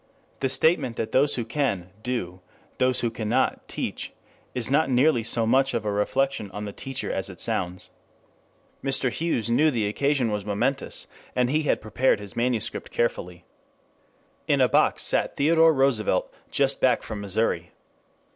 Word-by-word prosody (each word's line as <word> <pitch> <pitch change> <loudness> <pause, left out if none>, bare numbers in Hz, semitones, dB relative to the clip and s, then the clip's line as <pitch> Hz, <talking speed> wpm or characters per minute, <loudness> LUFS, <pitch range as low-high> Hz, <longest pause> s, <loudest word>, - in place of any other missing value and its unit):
The 135 - 0
statement 135 -2 +2
that 110 -1 -3
those 140 +2 +3
who 120 - -3
can, 110 -8 -2
do; 95 -7 -4 0.4
those 130 0 +3
who 120 - 0
cannot, 110 -2 -1
teach, - - -4 0.4
is 125 0 -1
not 150 +1 +3
nearly 130 0 +3
so 115 0 +2
much 135 +3 +3
of 115 -2 -2
a 105 - 0
reflection 120 +2 0
on 105 +2 -6
the 100 - -6
teacher 135 +4 -4
as - - -1
it - - -11
sounds. 90 +1 -2 0.9
Mr. 135 -2 +2
Hughes 120 -9 -1
knew 155 +6 +4
the 115 -7 0
occasion 135 +1 +1
was 105 -1 -2
momentous, 115 +7 -1 0.3
and 125 0 +2
he 155 +2 +2
had - - +2
prepared 110 +3 +1
his 100 -1 -8
manuscript 120 -2 -1
carefully. 90 -7 -2 1.0
In - - +2
a - - +5
box - - +2
sat - - 0
Theodore 160 +2 +5
Roosevelt 135 -9 +1 0.2
just - - +1
back - - +3
from 105 -2 -6
Missouri. 100 +3 -1
120 Hz, 160 wpm, -25 LUFS, 105-135 Hz, 1.0 s, a